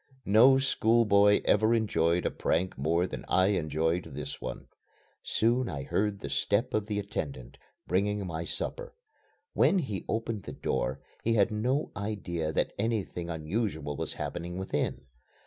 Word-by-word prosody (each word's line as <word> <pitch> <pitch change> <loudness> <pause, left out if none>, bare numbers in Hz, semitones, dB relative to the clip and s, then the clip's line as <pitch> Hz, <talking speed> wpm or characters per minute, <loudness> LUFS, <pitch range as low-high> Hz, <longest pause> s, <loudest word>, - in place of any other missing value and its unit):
No 120 +7 +7
schoolboy 110 -6 +4
ever 110 +3 +4
enjoyed 90 -6 +1
a - - +1
prank 90 +3 0
more 85 +6 +1
than - - -6
I 95 +1 +3
enjoyed 80 -1 0
this 75 -1 -6
one. - - -6 0.6
Soon 120 +3 +1
I 70 -4 -4
heard 105 0 0
the - - -4
step 115 +6 +1
of 105 -1 0
the 105 -2 -2
attendant, 70 -11 -5 0.3
bringing 100 +3 0
my 85 -2 -4
supper. - - -5 0.6
When 195 - +4
he 115 - -2
opened 115 -1 -2
the - - -6
door, 65 +3 -2 0.2
he 115 - +2
had 105 +1 +3
no 125 +8 0
idea 95 -6 -3
that - - 0
anything 100 -6 -2
unusual 80 -2 -2
was - - -4
happening 90 +1 -5
within. 95 0 -2
100 Hz, 145 wpm, -29 LUFS, 85-110 Hz, 0.6 s, No